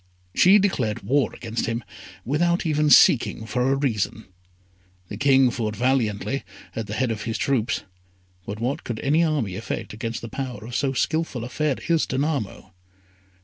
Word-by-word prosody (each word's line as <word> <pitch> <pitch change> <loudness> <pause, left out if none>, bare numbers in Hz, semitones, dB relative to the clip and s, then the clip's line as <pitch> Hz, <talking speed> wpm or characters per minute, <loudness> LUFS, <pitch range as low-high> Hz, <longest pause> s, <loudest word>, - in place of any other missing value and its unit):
She 190 +3 +6
declared 120 - 0
war 135 +7 +2
against 115 -1 -4
him 115 +1 -2 0.4
without 170 +7 +1
even 150 -1 +2
seeking 115 -4 +5
for 125 +3 0
a - - +3
reason. 115 -5 -1 0.8
The - - -6
King 135 -2 +4
fought 110 -3 -3
valiantly, 120 0 0 0.3
at 115 -2 -4
the 105 - -4
head 125 0 0
of 105 -2 -4
his 115 -1 -2
troops; 130 -3 0 0.6
but 105 +1 -5
what 125 +5 -2
could 115 -3 -4
any 155 +4 +3
army 145 - 0
effect 110 +1 -5
against 115 +2 -5
the - - -4
power 125 -4 -5
of 120 +1 -7
so 135 -2 0
skilful 155 -3 -1
a 120 - -6
Fairy 150 +1 -1
as 165 -2 +2
Danamo? 130 -8 -2
125 Hz, 165 wpm, -24 LUFS, 110-145 Hz, 0.8 s, She